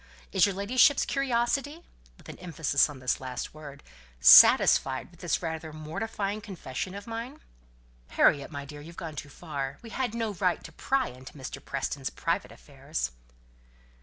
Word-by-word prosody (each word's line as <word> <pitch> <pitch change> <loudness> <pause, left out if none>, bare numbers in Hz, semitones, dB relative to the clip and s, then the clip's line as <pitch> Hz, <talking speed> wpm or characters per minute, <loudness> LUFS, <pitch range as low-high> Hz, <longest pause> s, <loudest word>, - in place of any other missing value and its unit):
Is 195 +1 +4
your 200 - -3
ladyship's 255 +8 +4
curiosity" 275 +4 -1 0.3
(with - - -17
an - - -10
emphasis 160 -5 +1
on 145 - -9
this 130 0 -1
last 125 -1 -5
word) 145 -2 -11 0.4
"satisfied 130 - +7
with 175 - -20
this 175 0 -1
rather 160 -1 -4
mortifying 200 +7 -4
confession 185 - -6
of 200 0 -8
mine?" 230 +5 -6 0.7
"Harriet, 140 -2 +3
my 140 -1 -7
dear, 145 +1 -10
you've 165 +3 -12
gone 165 -4 -6
too 145 0 -7
far 140 -2 -5
we 230 - -10
had 245 -3 -2
no 225 -2 -2
right 180 -1 0
to 160 - -10
pry 265 +10 0
into 130 +1 -12
Mr. 130 - -8
Preston's 135 0 -3
private - - -2
affairs." 60 -1 -5
165 Hz, 160 wpm, -28 LUFS, 140-225 Hz, 0.7 s, satisfied